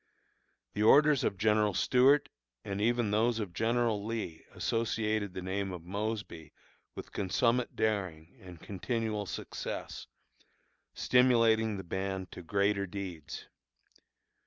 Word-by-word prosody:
The 105 - -2
orders 145 +5 +6
of 100 - 0
General 105 -1 +2
Stuart 130 +7 +4 0.4
and 100 0 -3
even 120 -1 +1
those 115 +2 +2
of 100 -5 -4
General 115 -1 +1
Lee 110 -7 -4
associated 110 -3 -1
the 95 - -4
name 95 +1 -2
of 90 -3 -7
Mosby 100 -4 -4 0.4
with - - -8
consummate 115 +5 0
daring 95 -7 -2
and 90 -3 -11
continual 105 +1 -3
success, - - -6 0.9
stimulating 115 -4 +3
the 95 - -6
band 95 +1 -4
to - - -8
greater 100 +2 0
deeds. 90 -5 -7
105 Hz, 115 wpm, -31 LUFS, 95-115 Hz, 0.9 s, orders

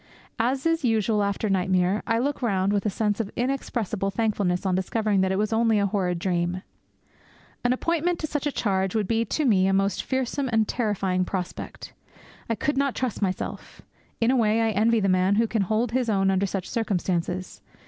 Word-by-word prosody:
As 260 +5 0
is 330 -2 +1
usual 220 -3 +2
after 200 +2 -1
nightmare, 185 0 +1
I 230 -1 +2
look 275 +5 -1
round 200 -4 +1
with 205 +1 0
a - - +2
sense 205 +1 -1
of 220 -3 -2
inexpressible 235 -6 -2
thankfulness 195 -3 0
on 190 - +1
discovering 200 +2 +1
that 190 0 +1
it 190 - 0
was 215 +2 0
only 225 -1 +3
a 200 - +2
horrid 185 -3 0
dream. 175 +1 -1 1.0
An 245 - +2
appointment 335 +6 0
to 315 - -3
such 295 -1 -2
a - - 0
charge 190 -5 0
would 210 -3 +1
be 230 +2 +1
to 300 +7 -1
me 190 -6 +4
a 195 - +2
most 195 +1 +1
fearsome 260 +1 -2
and 220 -2 +2
terrifying 195 -5 0
prospect. 180 -1 -5 0.6
I 230 - +1
could 280 +7 -1
not 275 -2 +1
trust 255 -5 -2
myself. 190 -2 -4 0.4
In 230 +2 +3
a - - +2
way, 225 -2 +3
I 225 -1 +2
envy 220 +2 +2
the 195 - +1
man 185 +1 +3
who 230 +2 +3
can 225 -1 -1
hold 220 +4 0
his 250 -1 0
own 195 -2 +2
under 195 +1 +1
such 195 -1 -4
circumstances. 185 -4 -2
210 Hz, 200 wpm, -25 LUFS, 190-235 Hz, 1.0 s, me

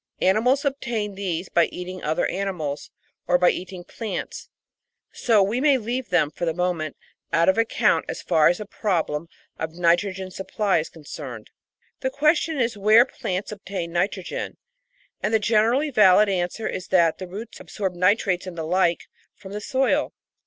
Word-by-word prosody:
Animals 250 +10 +3
obtain 235 -7 -2
these 185 -3 -3
by 170 -1 +3
eating 180 +1 -7
other 155 +3 0
animals 180 -7 -3 0.4
or 180 +1 +4
by 180 0 +4
eating 185 0 -7
plants; 215 +2 -6 0.6
so 220 -5 +3
we 220 +6 -1
may 285 -2 +5
leave 245 +2 -3
them, 175 -5 +2
for - - -7
the 165 -2 0
moment, 175 -4 -2 0.3
out 165 0 +3
of 190 - +5
account 230 0 +2
as - - -5
far 155 -1 +4
as 175 - +3
the 210 - -6
problem 170 -7 -1 0.3
of 160 0 -4
nitrogen 185 +2 +1
supply 195 0 0
is 155 - -4
concerned. 140 -7 -9 0.5
The 260 - -1
question 305 +3 +2
is 235 -2 +1
where 215 +4 +6
plants 190 -6 -4
obtain 195 -4 -5
nitrogen, 185 +1 -2 0.6
and 210 - -1
the - - +4
generally 230 +7 +2
valid 210 -3 +6
answer 185 +3 -1
is 185 - -5
that 170 -4 +3
the 185 - -6
roots 210 +6 -8
absorb 195 -3 -4
nitrates 185 0 +1
and 175 -2 -7
the 160 - -3
like 175 0 +2 0.3
from 190 - -12
the 210 +1 -5
soil. 265 +5 +1
190 Hz, 165 wpm, -24 LUFS, 175-220 Hz, 0.6 s, where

